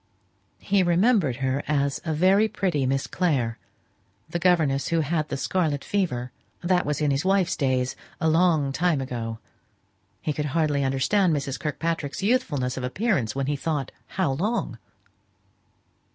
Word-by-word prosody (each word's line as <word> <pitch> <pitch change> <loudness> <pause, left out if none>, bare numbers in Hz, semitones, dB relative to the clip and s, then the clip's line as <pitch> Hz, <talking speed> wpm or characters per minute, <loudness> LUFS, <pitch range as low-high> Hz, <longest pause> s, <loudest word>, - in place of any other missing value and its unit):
He 200 -1 +1
remembered 180 - +3
her 130 +2 0
as 140 -2 0
a 160 - -2
very 190 +7 +4
pretty 170 -11 -1
Miss 135 +1 0
Clare: 130 - 0 0.7
the 175 +2 -3
governess 155 -7 +2
who 165 -1 +1
had 155 0 -1
the 140 - -2
scarlet 150 -2 0
fever; 125 -12 -1 0.3
that 180 -1 +2
was 150 0 -1
in 150 -1 +2
his 135 +1 0
wife's 190 -1 +2
days, 130 -2 0 0.2
a 160 - +1
long 160 -3 +3
time 165 +1 +1
ago; 115 -4 -4 0.8
he 150 - -2
could 150 +1 -2
hardly 150 -3 +2
understand 155 +7 +2
Mrs. 140 -1 -3
Kirkpatrick's 160 +1 -3
youthfulness 150 - 0
of 130 - -4
appearance 135 - 0
when 135 0 -1
he 145 +2 0
thought 145 -2 -2 0.2
how 185 -7 0
long. 205 - -2
150 Hz, 150 wpm, -25 LUFS, 135-180 Hz, 0.8 s, very